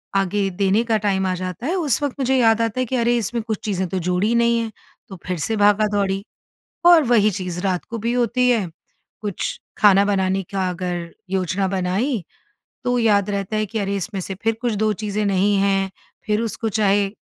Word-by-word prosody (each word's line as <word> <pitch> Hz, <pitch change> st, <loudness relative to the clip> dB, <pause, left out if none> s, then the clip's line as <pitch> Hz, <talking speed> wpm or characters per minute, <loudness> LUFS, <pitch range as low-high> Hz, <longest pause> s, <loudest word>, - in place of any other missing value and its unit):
आगे 195 Hz, +1 st, +1 dB
देने 200 Hz, +4 st, +1 dB
का 225 Hz, -2 st, +1 dB
टाइम 195 Hz, -2 st, 0 dB
आ 185 Hz, -, 0 dB
जाता 185 Hz, +5 st, -5 dB
है, 360 Hz, -, 0 dB
उस 300 Hz, -6 st, 0 dB
वक़्त 280 Hz, -, -1 dB
मुझे 265 Hz, 0 st, +1 dB
याद 230 Hz, -2 st, +4 dB
आता 230 Hz, +2 st, -1 dB
है 255 Hz, -, +1 dB
कि 255 Hz, -, -3 dB
अरे! 240 Hz, 0 st, +2 dB
इसमें 230 Hz, +1 st, -2 dB
कुछ 220 Hz, -3 st, -3 dB
चीज़ें 190 Hz, -3 st, -1 dB
तो 190 Hz, -, -2 dB
जोड़ी 180 Hz, +6 st, 0 dB
नहीं 235 Hz, 0 st, +3 dB
हैं, 225 Hz, -1 st, -3 dB, 0.4 s
तो 190 Hz, -, -8 dB
फिर 180 Hz, -1 st, -2 dB
से 220 Hz, +9 st, -1 dB
भागा-दौड़ी 205 Hz, -1 st, +2 dB, 0.6 s
और 340 Hz, -3 st, +8 dB
वहीं 220 Hz, -4 st, +3 dB
चीज़ 180 Hz, -2 st, -4 dB
रात 185 Hz, -2 st, -1 dB
को 230 Hz, -, -6 dB
भी 235 Hz, +3 st, -1 dB
होती 250 Hz, +1 st, +2 dB
है। 220 Hz, -7 st, +2 dB, 0.5 s
कुछ 205 Hz, -3 st, -3 dB, 0.2 s
खाना 200 Hz, -1 st, +5 dB
बनाने 190 Hz, -1 st, +1 dB
का 190 Hz, -2 st, 0 dB
अगर 175 Hz, -1 st, -4 dB, 0.2 s
योजना 190 Hz, 0 st, 0 dB
बनाई 190 Hz, +5 st, -1 dB, 0.6 s
तो 245 Hz, 0 st, +1 dB
याद 205 Hz, -3 st, +3 dB
रहता 200 Hz, +1 st, -2 dB
है 215 Hz, -, 0 dB
कि 220 Hz, +2 st, -3 dB
अरे 200 Hz, 0 st, -1 dB
इसमें 195 Hz, +1 st, -4 dB
से 195 Hz, +1 st, -5 dB
फिर 225 Hz, -, +2 dB
कुछ 240 Hz, -3 st, 0 dB
दो 215 Hz, 0 st, +3 dB
चीज़ें 210 Hz, 0 st, -2 dB
नहीं 200 Hz, +1 st, +2 dB
हैं, 195 Hz, -1 st, +1 dB, 0.4 s
फिर 215 Hz, +1 st, +1 dB
उसको 225 Hz, 0 st, -2 dB
चाहे 205 Hz, -1 st, +2 dB
205 Hz, 200 wpm, -21 LUFS, 190-230 Hz, 0.6 s, और